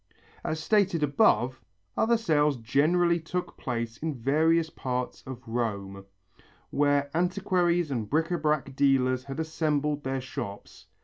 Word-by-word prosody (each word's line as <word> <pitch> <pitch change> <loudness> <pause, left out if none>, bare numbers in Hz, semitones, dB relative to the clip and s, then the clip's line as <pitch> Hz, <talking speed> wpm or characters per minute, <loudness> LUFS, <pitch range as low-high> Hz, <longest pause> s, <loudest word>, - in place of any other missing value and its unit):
As 155 - -2
stated 185 -2 +2
above, 135 - +3 0.4
other 235 +1 +3
sales 150 - +2
generally 160 +9 +2
took 175 +3 -4
place 115 -2 -4
in 155 0 -3
various 160 +6 +2
parts 125 -1 -4
of 130 -1 -8
Rome 100 -4 -3 0.7
where 145 0 +2
antiquaries 175 -2 +1
and 115 -5 -2
bric 160 +2 +1
à 175 -3 -1
brac 150 -3 0
dealers 130 -2 +2
had 135 +2 -6
assembled 150 -2 -1
their 135 0 -2
shops. 100 -5 -8
145 Hz, 130 wpm, -28 LUFS, 130-165 Hz, 0.7 s, above